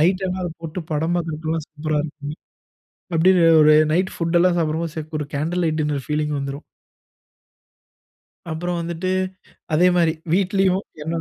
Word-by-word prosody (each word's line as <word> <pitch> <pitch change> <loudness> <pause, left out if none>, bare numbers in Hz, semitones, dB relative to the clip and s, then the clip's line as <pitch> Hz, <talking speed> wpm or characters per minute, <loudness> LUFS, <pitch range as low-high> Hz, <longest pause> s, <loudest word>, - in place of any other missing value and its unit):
Night 185 +4 +3
எல்லாம் 185 0 -3
அத 175 - -3
போட்டு 165 +2 -5
படம் 160 +3 0
பாக்குறதுக்கெல்லாம் 160 -1 -3
சூப்பரா 155 0 -2
இருக்கும். 150 -1 -7 0.8
அப்டியே 175 +1 +5 0.2
ஒரு 155 0 +7 0.2
நைட் 185 +3 +1
ஃபுட் 165 0 +1
எல்லாம் 175 0 +3
சாப்பிடும்போது 160 0 -1
ச - - 0 0.2
ஒரு 150 - -3
கேண்டில் 170 +5 -1
லைட் 155 -1 0
டின்னர் 145 -3 -2
பீலிங் 150 0 0
வந்துரும். 140 +2 -5 1.9
அப்புறம் 175 +2 -2
வந்துட்டு 170 +2 -3 0.6
அதே 175 +4 +5
மாரி 165 -2 +3 0.2
வீட்டுலயும், 190 0 +2 0.2
என்னா 165 +2 -2
165 Hz, 145 wpm, -22 LUFS, 155-180 Hz, 1.9 s, ஒரு